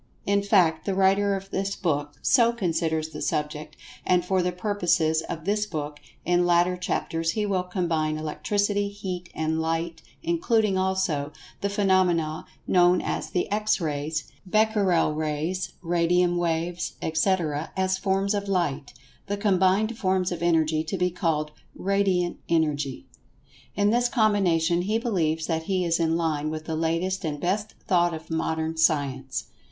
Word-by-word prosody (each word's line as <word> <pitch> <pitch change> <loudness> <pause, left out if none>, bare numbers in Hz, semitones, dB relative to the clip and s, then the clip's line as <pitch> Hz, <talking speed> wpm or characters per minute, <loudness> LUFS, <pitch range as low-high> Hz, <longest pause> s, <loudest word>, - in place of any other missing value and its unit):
In 200 0 +2
fact, 180 -6 +3
the 195 - 0
writer 195 +1 +3
of 195 0 -7
this 195 +1 -1
book 145 -4 -2
so 235 -3 +5
considers 165 -6 -1
the - - -8
subject, 150 0 -3 0.3
and 180 -1 +2
for 185 0 +1
the 180 0 0
purposes 175 -4 +1
of 165 -2 -5
this 210 +1 0
book, 150 -4 -5 0.3
in 175 +1 +3
later 175 +1 +3
chapters, 165 -2 -2
he 210 -1 -1
will 195 -3 +1
combine 170 -4 -1
Electricity, 205 +6 -1
Heat, 185 -3 -6
and 160 +1 -1
Light, 165 +1 -2 0.2
including, 230 - +1
also, 185 -6 0 0.3
the 200 - 0
phenomena 185 -6 +1 0.2
known 180 0 +4
as - - -3
the 180 - -1
X 210 +1 +1
Rays, 155 -1 -2 0.2
Becquerel 200 -5 +2
Rays, 155 +4 -2
Radium 175 +1 +2
waves, 170 0 -1
etc., 160 -2 0
as 190 0 +1
forms 195 +1 +1
of 200 -1 -2
Light—the 150 +1 -3
combined 200 +2 +2
forms 185 -2 +1
of 175 - -4
Energy 160 -2 +2
to 165 +4 -3
be 180 0 +1
called 155 -3 -1 0.2
"Radiant 190 -3 0
Energy." 145 - 0 0.7
In 205 +1 +3
this 240 +1 +2
combination, 185 -8 +2
he 210 +5 0
believes 165 -9 0
that 160 -1 -2
he 185 -1 0
is 165 0 +1
in 165 0 +2
line 155 -3 -1
with 155 0 -5
the 160 - -3
latest 165 +4 -1
and 150 -3 -3
best 205 +6 -2
thought 175 -4 +3
of 160 +1 -10
Modern 160 0 -1
Science. 140 -4 +1
175 Hz, 150 wpm, -25 LUFS, 160-195 Hz, 0.7 s, so